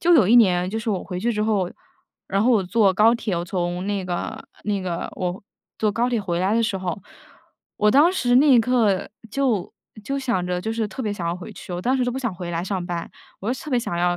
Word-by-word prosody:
就 345 0 +5
有 240 - +6
一 225 - +5
年 185 -6 +5
就 220 - -3
是 225 0 -2
我 190 -3 -2
回 180 -2 -5
去 235 +2 +1
之 210 - -1
后， 200 -5 +1 0.6
然 195 +1 +1
后 245 - +4
我 220 -5 +4
坐 200 +1 +3
高 215 +5 +5
铁， 215 -6 -2
我 170 - -2
从 175 +1 -2
那 200 -2 -1
个 175 -1 -4 0.2
那 205 -2 0
个 175 -2 -3
我 180 0 -3 0.4
坐 215 -1 +1
高 240 +4 0
铁 235 -3 +1
回 175 -3 -2
来 190 +3 +1
的 230 - +3
时 220 -3 0
候， 185 0 -4 0.8
我 210 - +3
当 295 +9 +6
时 245 -9 +1
那 290 +3 +6
一 255 -3 +7
刻 225 -5 +1 0.2
就 235 -7 0 0.3
就 275 +3 -2
想 235 -10 -1
着 180 0 -1
就 220 +4 -3
是 225 -1 -1
特 260 - -6
别 210 -3 -1
想 180 -4 -4
要 170 - 0
回 180 - -9
去， 180 - -9
我 175 - -3
当 255 +7 +1
时 255 - +1
就 245 - 0
不 265 - -3
想 235 -8 -2
回 175 0 -6
来 170 0 -2
上 190 -2 -2
班， 175 -2 -4 0.3
我 215 +5 -1
就 255 - -5
特 305 - -7
别 250 - +3
想 230 -7 -3
要 175 0 +2
205 Hz, 280 characters per minute, -23 LUFS, 180-240 Hz, 0.8 s, 一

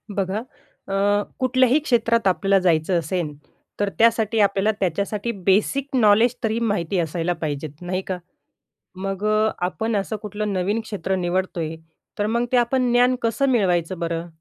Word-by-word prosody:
बघा, 195 +1 -1 0.5
अ, 205 +1 +1 0.2
कुठल्याही 255 +2 +3
क्षेत्रात 230 -6 +1
आपल्याला 195 +1 +3
जायचं 170 0 +2
असेल, 165 -1 -3 0.5
तर 205 -1 +1
त्यासाठी 225 -1 +3
आपल्याला 200 +1 +3
त्याच्यासाठी 200 +5 -1
बेसिक 265 +8 +1
नॉलेज 225 +1 +4
तरी 225 +1 0
माहिती 200 -5 0
असायला 170 +1 -1
पाहिजेत, 150 0 -4
नाही 185 +1 -2
का? 185 - -2 0.8
मग 195 +1 -4
अ, 215 +1 +3 0.2
आपण 220 +5 -2
असं 200 +2 -1
कुठलं 210 -1 -3
नवीन 195 +4 0
क्षेत्र 195 -4 -3
निवडतोय, 175 -3 -2 0.4
तर 205 - +1
मग 235 +2 0
ते 255 - +4
आपण 245 +1 +2
ज्ञान 245 +1 +4
कसं 270 +4 +1
मिळवायचं 185 -6 +1
बरं? 170 0 -3
205 Hz, 145 wpm, -22 LUFS, 180-230 Hz, 0.8 s, नॉलेज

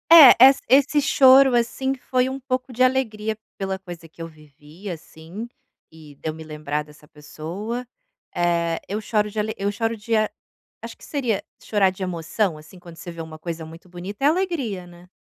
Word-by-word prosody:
É, 320 -6 +11
essa 265 +2 +7
esse 285 +3 +4
choro, 265 -1 +6
assim, 265 +3 0
foi 255 0 0
um 265 +1 -5
pouco 255 -1 -3
de 250 +2 +2
alegria 220 -5 0 0.2
pela 190 -1 -3
coisa 175 -3 -10
que 165 - -14
eu 165 - -5
vivi, 155 +4 -13
assim, 170 +5 -8 0.4
e 155 -2 -15
de 150 - -8
eu - - -3
me 160 0 -10
lembrar 150 -1 -4
dessa 150 0 -18
pessoa. 175 +11 -7 0.5
Eh, 170 -1 0
eu 205 +2 -2
choro 210 -1 0
de 215 +1 -5
ale 215 +1 -1
eu 200 +1 -1
choro 225 +2 -2
de 225 +1 -2
a 215 0 +2 0.5
acho - - -8
que - - -15
seria 250 -8 -1 0.2
chorar 200 -3 +2
de 185 - -13
emoção, 170 +1 -1
assim, 155 +4 -15
quando 170 -1 -13
você 175 - -8
vê 165 -1 -8
uma 160 -1 -9
coisa 165 -1 -5
muito 165 +3 -13
bonita 185 +6 -8
é - - +7
alegria, 295 - -1
né. 175 0 -16
195 Hz, 195 wpm, -23 LUFS, 165-245 Hz, 0.5 s, É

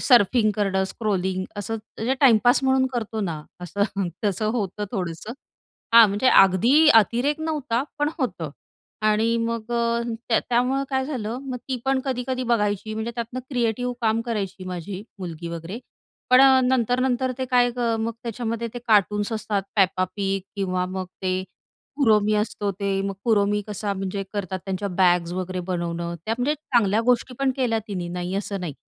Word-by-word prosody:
Surfing 225 -2 +4
करणं 190 -2 +1
scrolling 190 -3 -1
असं 205 +2 -3 0.2
म्हणजे 245 +4 -1
टाईमपास 245 0 +5
म्हणून 265 0 +3
करतो 220 -2 -3
ना, 165 -6 -3 0.2
असं 195 +2 -1 0.2
तसं 205 +2 0
होतं 210 -3 -2
थोडंसं. 180 +2 -4 0.6
हां 230 -2 +10
म्हणजे 205 +6 +2
अगदी 230 - +6
अतिरेक 245 +8 +3
नव्हता, 295 -6 -1 0.2
पण 295 0 +2
होतं. 180 - -2 0.6
आणि 220 +2 +2
मग 230 0 -2
अ, 235 0 +1 0.3
त्या 225 - +4
त्यामुळे 250 +3 +1
काय 265 0 +1
झालं 240 -4 -3
मग 255 -2 -3
ती 260 - -1
पण 270 0 +2
कधी-कधी 255 0 -2
बघायची 210 -1 0
म्हणजे 220 +2 -3
त्यातनं 235 +2 -4
क्रिएटिव 245 -1 0
काम 225 -1 +2
करायची 195 -4 -3
माझी 185 +2 -5 0.2
मुलगी 170 -2 -6
वगैरे 170 +6 -6 0.5
पण 255 +1 +8 0.3
नंतर-नंतर 255 +1 +1
ते 260 - -1
काय 245 -1 +3 0.3
मग 230 +1 -1
त्याच्यामध्ये 230 0 -3
ते 245 - -3
कार्टून्स 210 0 +3
असतात, 215 -2 -1 0.2
Peppa 185 -1 +3
Pig 195 0 0 0.2
किंवा 185 -2 0
मग 185 0 -4 0.2
ते 185 0 0 0.6
Kuromi 215 -4 +4
असतो 205 -1 -2
ते. 195 0 -1
मग 195 0 -3
Kuromi 205 -1 +3
कसा 205 -1 -3
म्हणजे 195 +1 -3
करतात, 190 -2 -3
त्यांच्या 195 +1 -3
बॅग्स 175 -1 +3
वगैरे 185 0 -3
बनवणं 170 -1 -3
त्या 225 - 0
म्हणजे 280 +5 +1
चांगल्या 230 -8 +1
गोष्टी 250 +1 0
पण 275 -1 +2
केल्या 240 -4 +1
तिनी 180 -4 -4
नाही 180 +1 -4
असं 200 -1 -3
नाही. 165 -5 -4
215 Hz, 160 wpm, -24 LUFS, 190-245 Hz, 0.6 s, हां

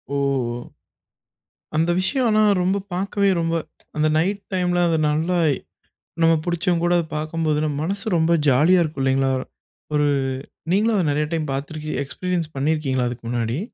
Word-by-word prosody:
ஓ! - - +1 1.6
அந்த 165 +2 +2
விஷயம் 250 +6 +1
ஆனா 215 0 +3 0.5
பாக்கவே 200 +2 +1
ரொம்ப 165 0 0 0.4
அந்த 155 0 +3
நைட் 195 +5 0
டைம்ல 180 -1 +1
அது 165 - +2
நல்லா, 160 +4 0 0.9
நம்ம 165 0 +5
புடிச்சவங்க 175 0 0
கூட 175 0 +3
அத 170 - 0
பாக்கும்போது 155 -1 -1
நம்ம 150 -2 -1
மனசு 200 +4 -3
ரொம்ப 160 +1 +2 0.2
ஜாலியா 160 +8 +5
இருக்கும் 155 -4 -3
இல்லைங்களா. 135 0 +2 0.6
ஒரு 150 0 +3 0.6
நீங்களும் 215 +4 +3
அத 180 -5 +1
நெறைய 150 +1 0
டைம் 155 -3 -1
பாத்துருக்கீங்க, 150 +3 -4
எக்ஸ்பீரியன்ஸ் 175 +3 -3
பண்ணிருக்கீங்களா 135 -3 0
அதுக்கு 120 -1 -8
முன்னாடி. 120 +1 -1
160 Hz, 140 wpm, -22 LUFS, 150-180 Hz, 1.6 s, நம்ம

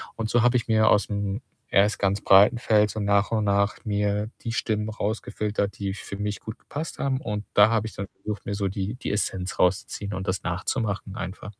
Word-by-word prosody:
und 110 -1 -3
so 120 - +3
habe 125 +1 +4
ich 120 - -3
mir 110 -1 +4
aus'm 100 +1 0 0.3
erst 105 +2 +3
ganz 100 0 +1
breiten 100 +4 +6
Feld 105 -3 +3
so 110 - -5
nach 100 +1 +2
und 110 -2 +1
nach 100 0 +2
mir 105 0 0
die 115 - -2
Stimmen 110 -2 -1
rausgefiltert, 105 -2 -2
die 100 -1 -2
für 100 0 -7
mich 105 0 -3
gut 110 +1 -8
gepasst 155 +2 -6
haben 135 0 0
und 105 -5 -4
da 105 +1 +7
habe 110 -1 +1
ich - - -10
dann 100 - -5
versucht, 105 -1 -6
mir 100 - -2
so 100 -1 -1
die 100 +3 -3
die 130 - -4
Essenz 95 -2 -2
rauszuziehen, 100 +2 0
und 95 +1 -4
das 95 0 -1
nachzumachen 100 +3 -2
einfach. 95 +2 -6
105 Hz, 205 wpm, -25 LUFS, 100-110 Hz, 0.3 s, da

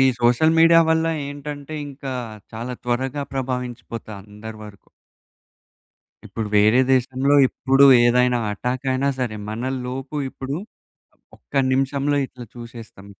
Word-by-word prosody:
ఈ - - +6 0.2
social 125 +7 +3
media 165 0 +7
వల్ల 160 0 +2 0.2
ఏంటంటే, 145 +1 -7
ఇంకా 135 -1 -7 0.4
చాలా 115 +3 -5
త్వరగా 130 +4 -1
ప్రభావించిపోతా 125 -4 -5
అందరి 105 +2 -10
వరకు. 105 -2 -14 1.4
ఇప్పుడు, 110 -2 -5
వేరే 110 +5 +5
దేశంలో 130 +2 +2
ఇప్పుడు 135 +1 +3 0.2
ఏదైనా 125 +1 +3
అటాక్ 125 +5 -3
అయినా 135 +2 0
సరే, 120 -4 -2
మనలోపు 130 +4 -4
ఇప్పుడు 135 +3 -5 0.8
ఒక్క 140 - -4
నిమిషంలో 140 +2 +1
ఇట్లా 125 -1 -11
చూసేస్తాం. 115 -4 -11
130 Hz, 115 wpm, -22 LUFS, 120-140 Hz, 1.4 s, media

